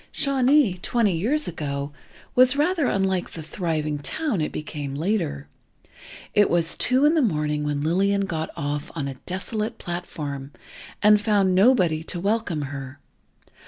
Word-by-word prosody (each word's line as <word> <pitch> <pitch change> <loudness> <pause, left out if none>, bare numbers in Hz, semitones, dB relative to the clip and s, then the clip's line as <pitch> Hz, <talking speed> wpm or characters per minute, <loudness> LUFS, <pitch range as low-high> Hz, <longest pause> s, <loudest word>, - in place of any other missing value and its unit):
Shawnee, 270 -7 +3
twenty 220 -5 +1
years 275 - 0
ago, 145 -3 -4 0.4
was 255 +1 +5
rather 310 0 +2
unlike 190 -2 0
the 160 - -8
thriving 155 -3 -2
town 235 - -2
it 155 - -1
became 145 -2 -5
later. 150 - -1 0.9
It 205 -1 +4
was 170 -1 +1
two 255 +3 +3
in 300 - +5
the 325 - +3
morning 150 - 0
when 145 -1 -1
Lillian 195 +5 +1
got 160 -4 -3
off 145 +1 -3
on 145 -4 -2
a 135 - -4
desolate 215 +5 -3
platform, 145 -5 -6 0.5
and 210 0 +6
found 200 -3 +2
nobody 185 -6 +4
to 175 - -5
welcome 195 -5 -1
her. 135 -1 -7
180 Hz, 145 wpm, -24 LUFS, 150-220 Hz, 0.9 s, and